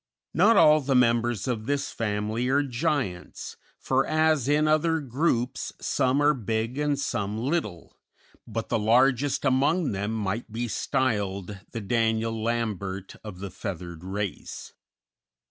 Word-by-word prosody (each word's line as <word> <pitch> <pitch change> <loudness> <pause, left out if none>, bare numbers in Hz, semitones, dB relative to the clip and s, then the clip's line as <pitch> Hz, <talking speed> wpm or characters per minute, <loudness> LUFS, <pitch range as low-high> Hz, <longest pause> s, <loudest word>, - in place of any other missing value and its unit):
Not 230 - +5
all 155 0 +6
the 135 -1 0
members 120 -3 +2
of 115 -3 -2
this 145 0 -1
family 110 +2 -2
are 140 +2 +3
giants, 130 - -3 0.2
for - - +1
as 155 -4 +2
in 150 +1 +3
other 160 +1 +2
groups, 130 -2 -1
some 130 +1 +1
are 150 +1 +5
big 115 +1 -2
and 150 -1 +1
some 105 -6 -2
little, 115 - -3 0.5
but - - -4
the - - +1
largest 125 +6 +3
among 140 +5 +2
them 100 +2 -2
might 110 +1 -3
be 120 +2 -2
styled 100 -3 -1
the 115 - -4
Daniel 115 +1 0
Lambert 105 -5 -3
of 100 -4 -9
the 100 -1 -5
feathered 85 -4 -6
race. 95 -2 -5
115 Hz, 135 wpm, -26 LUFS, 105-140 Hz, 0.5 s, all